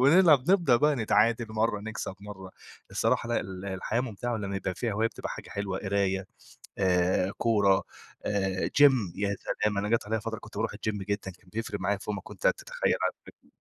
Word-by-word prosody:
ونلعب 150 0 +6
نبدأ 175 -10 +5
بقى 150 +4 +3
نتعادل 115 +1 +3
مَرّة 110 -1 0
نكسب 110 -2 -5
مَرّة 95 -2 -9 0.4
الصراحة 115 +1 +1
لأ 120 - +1
ال 95 -1 -7
الحياة 100 +4 -1
مُمتعة 120 -1 -3
لمّا 100 -2 -3
يبقى 95 -1 -2
فيها 115 +1 -2
هواية 110 +3 +1
بتبقى - - -7
حاجة - - -7
حلوة، 100 -2 -3
قراية 95 -1 0 0.5
آآ، 90 0 +2
كورة 100 -4 +3 0.4
آآ، 95 -2 0
جيم، 130 -11 +5
يا 100 0 -1 0.3
سلام! 105 -1 +1
أنا 105 +1 -1
جات 115 -2 +1
عليَّ 110 0 -1
فترة 110 0 -4
كنت 105 -2 -13
باروح 110 +2 -1
الجيم 105 0 -3
جدًا 100 0 -3
كان 90 +1 -19
بيفرق 115 +1 -3
معايا 100 +2 0
فوق 105 +1 -4
ما 100 - -4
كنت - - -4
تتخيل - - +1
على - - +2
فكر - - -17
105 Hz, 190 wpm, -28 LUFS, 95-115 Hz, 0.5 s, ونلعب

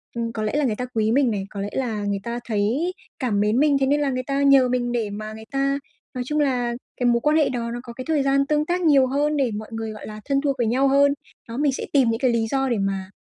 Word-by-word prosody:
ừm, 230 -1 -2
có 215 -1 -3
lẽ 215 - -1
là 295 -1 +2
người 225 -5 0
ta 250 - -3
quý 220 0 +2
mình 255 -1 +3
này, 200 -2 -2
có 200 - -6
lẽ 200 - -3
là 225 -6 -2
người 200 -1 -1
ta 235 +2 -4
thấy 235 - 0 0.3
cảm 230 -6 0
mến 210 +4 +2
mình, 290 -1 +4
thế 270 - +2
nên 290 +1 +2
là 285 - +1
người 255 -1 -2
ta 275 +1 -1
nhờ 275 -2 +5
mình 245 -1 0
để 230 -3 -1
mà 215 +1 -6
người 220 0 -10
ta 275 0 0 0.3
nói 250 - -3
chung 300 +2 0
là 250 -4 0 0.2
cái 245 - +1
mối 235 -1 +3
quan 300 +4 +3
hệ 305 - +3
đó, 235 -2 -3
nó 240 - -4
có 235 -2 -9
cái 255 +1 -7
thời 310 -3 +2
gian 275 0 +2
tương 300 +1 +1
tác 355 +2 -1
nhiều 280 -5 +5
hơn 290 +3 0
để 260 -4 +1
mọi 215 +1 -6
người, 225 -1 -4
gọi 215 - -9
là, 215 0 -8
thân 275 -1 +1
thuộc 280 -2 0
với 240 -3 +1
nhau 260 +4 +2
hơn. 280 +1 +4 0.3
Đó, 230 +1 -6
mình 290 0 +2
sẽ - - -4
tìm 265 -5 +4
những 225 0 -1
cái 255 -2 +2
lý 225 -1 0
do 270 +2 0
để 235 - +1
mà 195 -1 -2
250 Hz, 300 wpm, -23 LUFS, 225-275 Hz, 0.3 s, nhờ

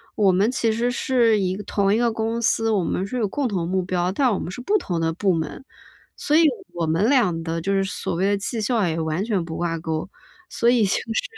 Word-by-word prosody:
我 200 -3 +4
们 195 +4 +2
其 235 -3 0
实 235 +2 0
是 240 -3 +2
一 185 -1 0
个 205 - -7
同 200 0 +1
一 - - +2
个 235 -1 +2
公 225 +1 -2
司， 225 0 +1
我 200 -4 +1
们 185 - -1
是 250 +6 -4
有 215 - +1
共 275 +7 -1
同 180 -6 -2
目 185 0 0
标， 180 0 -1
但 250 +3 +2
我 - - -1
们 - - -5
是 250 - -7
不 410 +12 +2
同 175 - -3
的 165 0 0
部 190 +3 +1
门， 165 +8 -3 0.5
所 295 - 0
以 330 - +6 0.3
我 170 -2 -2
们 165 +7 +2
俩 210 -12 +2
的 165 0 -3
就 195 +4 -1
是 195 0 +2
所 190 -3 -4
谓 180 +3 0
的 205 0 +2
绩 225 +4 -4
效 220 -3 +1
也 165 0 -2
完 160 +3 -1
全 205 -5 -1
不 160 -1 -6
挂 170 -1 -1
钩。 160 -1 -4 0.4
所 235 - +1
以 240 -2 +4
就 - - -1 0.2
是 - - 0
200 Hz, 275 characters per minute, -23 LUFS, 175-230 Hz, 0.5 s, 以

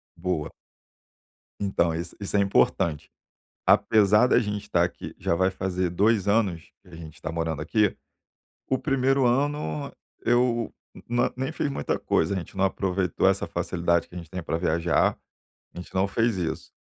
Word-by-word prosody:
Boa. 85 -3 -2 1.1
Então, 90 -4 +1
isso 85 +2 -5
isso 100 0 -4
é - - +5
importante. 95 -5 +1 0.6
Apesar 105 +2 +5
da - - +4
gente 105 -1 -3
estar - - +1
aqui, - - -6
já - - 0
vai 95 +2 +2
fazer 95 -2 -2
2 105 +2 +2
anos, 100 -6 0
que - - -21
a 85 - -11
gente 80 0 -11
tá 80 - -3
morando 80 -2 -2
aqui, 105 +4 +1 0.7
o 130 - +1
1º 135 -1 +2
ano 125 - 0 0.3
eu 120 -1 +2 0.4
na 120 +1 +1
nem 130 +1 -2
fiz 145 - -2
muita 70 - -2
coisa, 80 +5 +1
a - - -1
gente 90 - -8
não 95 - +2
aproveitou 95 -2 0
essa - - +1
facilidade 85 -1 0
que - - -15
a 90 - -5
gente 85 - -9
tem 90 -2 -5
pra 80 - -2
viajar, 85 0 +1 0.6
a - - -14
gente 90 - -9
não 95 +1 +2
fez 115 0 +1
isso. 85 -3 -4
95 Hz, 170 wpm, -26 LUFS, 85-110 Hz, 1.1 s, é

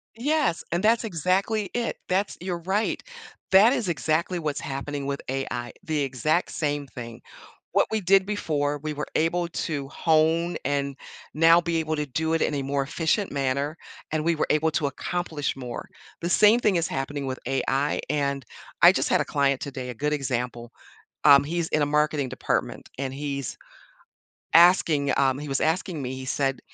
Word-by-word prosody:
Yes, 280 - 0
and 175 +3 0
that's 225 +2 +4
exactly 195 +2 0
it. 240 -1 -2
That's 190 +2 0
you're 180 -1 -3
right, 190 +6 -1 0.5
that 210 +7 +7
is 220 -9 -1
exactly 170 +2 0
what's 150 -3 -2
happening 140 +1 -4
with 140 0 -3
AI, 130 -2 -3
the 155 -2 -1
exact 140 +6 0
same 145 -2 -2
thing. 120 -3 -9 0.5
What - - +3
we 220 - 0
did 195 +1 +4
before, 150 -8 -1
we 155 0 -2
were 150 +1 -4
able 170 +2 +1
to 150 -4 -3
hone 165 +2 +2
and 140 0 -1 0.4
now 165 +2 +6
be 170 -1 -1
able 160 -1 -1
to 150 -1 -2
do 160 +4 -1
it 165 - +1
in - - 0
a 140 - -1
more 140 +1 -1
efficient 165 +7 -1
manner, 140 +2 -1 0.4
and 155 -1 0
we 170 0 +2
were 155 - 0
able 155 +1 +2
to 155 -1 0
accomplish 150 +1 -3
more. 125 -3 -7 0.3
The 170 - -2
same 210 +5 +5
thing 210 -5 +2
is 170 -1 +1
happening 140 +1 -3
with 130 -1 -4
AI, 135 +2 0
and 140 -2 -1 0.4
I - - +10
just - - -1
had - - +3
a - - -2
client 140 -2 +1
today, 130 -2 -5
a 125 - -6
good 150 +5 -1
example, 125 -4 -3 0.5
um, 140 -2 +8
he's 165 +2 -2
in 155 - +1
a - - +3
marketing 150 -2 +1
department, 130 - -2
and 135 -1 -3
he's 140 -2 -4 1.0
asking, 165 -5 +5
um 135 -1 +2
he 150 - -6
was 135 0 -1
asking 165 0 0
me, 130 -1 -4
he 130 0 -7
said, 135 0 -1
150 Hz, 180 wpm, -25 LUFS, 140-170 Hz, 1.0 s, I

